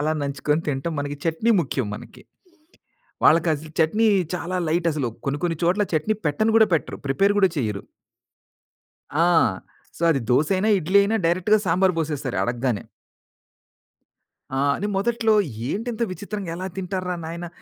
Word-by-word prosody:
అలా 155 +1 +1
నంచుకొని 145 +2 -1
తింటం. 145 +4 -2
మనకి 145 0 -4
చెట్నీ 165 +8 +1
ముఖ్యం 135 -5 -2
మనకి. - - -11 1.0
వాళ్ళకసలు 155 -1 +3
చట్నీ 210 +8 +3 0.3
చాలా 180 +1 -3
లైటసలు. 155 -5 0 0.2
కొన్ని 140 +1 -1
కొన్ని 165 -2 0
చోట్ల, 180 +5 +2
చట్నీ 160 +8 +1
పెట్టను 215 +10 +1
గూడా 220 -1 +6
పెట్టరు, 155 - -2
ప్రిపేర్ 195 +9 +2
గూడా 190 -2 +5
చెయ్యరు. 105 -6 -2 1.3
ఆ! 165 +4 +2 0.7
సో, - - -8
అది 135 -4 +1
దోసయినా, 185 - +2
ఇడ్లీ 185 +4 +3
అయినా 220 +3 +1
డైరెక్ట్‌గా 185 +5 +3
సాంబారు 180 +2 +3
పోసేస్తారు 145 -5 -2
అడగ్గానే. 120 -2 -1 1.7
ఆ! - - 0 0.2
నే - - +1
మొదట్లో 225 +1 +2 0.3
ఏంటింత 230 - -3
విచిత్రంగా 200 -1 -6
ఎలా 185 +1 -4
తింటారు 185 0 -3
రా - - 0
నాయనా 170 +2 -6
170 Hz, 135 wpm, -23 LUFS, 145-195 Hz, 1.7 s, గూడా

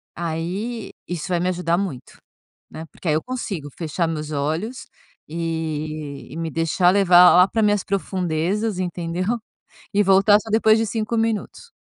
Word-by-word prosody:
aí 180 +8 -4 0.2
isso 175 0 -4
vai 180 -2 0
me 180 +1 0
ajudar 175 -2 0
muito, 175 -10 -5 0.5
né. 160 - -8
Porque - - -9
aí 155 - +3
eu 155 - -1
consigo 200 - -5
fechar 165 +1 -1
meus 155 -1 -4
olhos, 160 - -3 0.4
eh, - - -11 1.0
e 150 - -8
me 165 -1 -3
deixar 165 +3 +2
levar 180 -2 +7
lá 180 +1 +7
para 225 +2 -1
minhas 205 -2 +2
profundezas, 190 +2 -1
entendeu? 175 -1 -3 0.7
E 205 - +4
voltar 195 +2 +5
só 220 - -10
depois 220 0 +4
de 225 - +1
5 220 +1 -2
minutos. 225 - -2
180 Hz, 155 wpm, -22 LUFS, 165-210 Hz, 1.0 s, levar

